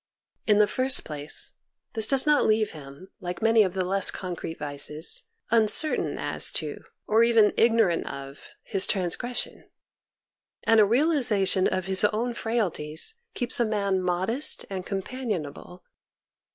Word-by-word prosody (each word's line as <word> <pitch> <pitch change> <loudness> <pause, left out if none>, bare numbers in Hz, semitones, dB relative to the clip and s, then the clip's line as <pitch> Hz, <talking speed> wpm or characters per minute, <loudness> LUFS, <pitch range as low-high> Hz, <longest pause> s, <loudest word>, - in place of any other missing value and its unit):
In 210 -2 +4
the 210 - +5
first 255 +4 0
place, 150 0 0 0.4
this 220 -2 +2
does 270 -1 +3
not 300 -1 +3
leave 215 -1 +1
him, 145 +4 -12
like 180 +3 -6
many 225 0 +4
of 190 -3 0
the 185 -1 0
less 195 +1 +2
concrete 175 -3 -6
vices, 150 +2 0 0.2
uncertain 230 +7 +2
as - - +2
to, - - -4 0.3
or 220 +2 +3
even 230 -3 +3
ignorant 225 -7 +2
of, 140 0 -10
his 195 -3 0
transgression; 200 +6 -3 0.9
and 225 -1 +4
a 210 - +6
realization 230 - +2
of 185 -1 -2
his 190 +1 +3
own 225 +4 -1
frailties 200 - 0 0.2
keeps 245 +2 -1
a - - +3
man 200 -4 -1
modest 185 +10 0
and 185 -2 -5
companionable. 195 - -6
205 Hz, 140 wpm, -25 LUFS, 180-230 Hz, 0.9 s, a